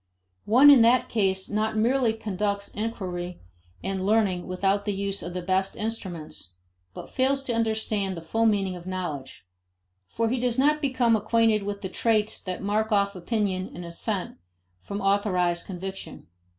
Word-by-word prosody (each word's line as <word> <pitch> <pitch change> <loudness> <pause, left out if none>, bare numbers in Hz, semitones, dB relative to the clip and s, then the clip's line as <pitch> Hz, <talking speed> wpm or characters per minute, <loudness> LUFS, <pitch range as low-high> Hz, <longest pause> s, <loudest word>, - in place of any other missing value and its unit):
One 260 +7 +8
in 270 -4 +8
that 235 +2 +4
case 190 -4 +1
not 215 +1 -1
merely 235 +1 +2
conducts 200 -2 -2
inquiry 180 -5 -4 0.4
and 190 0 -2
learning 200 -3 +1
without 195 +2 0
the 205 -2 -1
use 200 0 -2
of 175 +1 -6
the 180 - -3
best 190 +1 0
instruments, 180 - -6 0.4
but - - -8
fails 270 +1 +1
to 250 - -1
understand 220 -4 0
the 165 - -7
full 225 +7 +1
meaning 195 -3 +1
of 175 0 -10
knowledge. 155 - -5 0.6
For 230 - -1
he 250 +3 0
does 245 0 0
not 300 +3 +3
become 255 -5 +2
acquainted 220 0 +2
with 200 0 -4
the 190 - -3
traits 215 +1 0
that 185 -1 -5
mark 215 +2 0
off 200 -1 +2
opinion 190 0 -1
and 175 - -7
assent 185 +3 -3 0.4
from 200 - -5
authorized 190 -3 +1
conviction. 190 +1 -7
200 Hz, 160 wpm, -26 LUFS, 185-225 Hz, 0.6 s, One